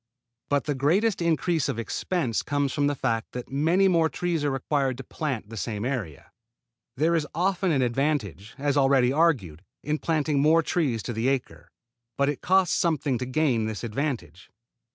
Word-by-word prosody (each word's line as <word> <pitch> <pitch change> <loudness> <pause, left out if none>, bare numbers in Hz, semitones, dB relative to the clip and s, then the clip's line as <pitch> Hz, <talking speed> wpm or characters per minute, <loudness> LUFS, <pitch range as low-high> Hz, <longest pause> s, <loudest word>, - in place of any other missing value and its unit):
But 145 -1 +1
the 150 - -1
greatest 180 +10 +1
increase 170 -1 +1
of - - -2
expense 115 - -1
comes 145 -2 -1
from 145 0 +1
the 145 - 0
fact 115 -3 -2
that 125 0 -7
many 165 +8 +3
more 165 -3 +3
trees 170 -3 -2
are 145 - +1
required 135 -1 -1
to 135 - -7
plant 130 -8 -4
the 115 - -8
same 105 +3 -3
area. 110 - -4 0.7
There 160 +4 +2
is 160 -3 0
often 185 +1 +1
an 135 -4 +2
advantage, 120 - -1
as 145 0 0
already 135 -2 +4
argued, 120 - +1 0.2
in 150 +1 -1
planting 155 -3 0
more 160 +3 +4
trees 135 - 0
to 120 - -4
the 115 +3 -1
acre, 135 -2 -2 0.5
but 140 0 +2
it 145 - -3
costs 185 -1 +3
something 150 -7 0
to 125 - -3
gain 130 -5 +1
this 110 0 -5
advantage. 115 - -4
140 Hz, 175 wpm, -26 LUFS, 120-160 Hz, 0.7 s, already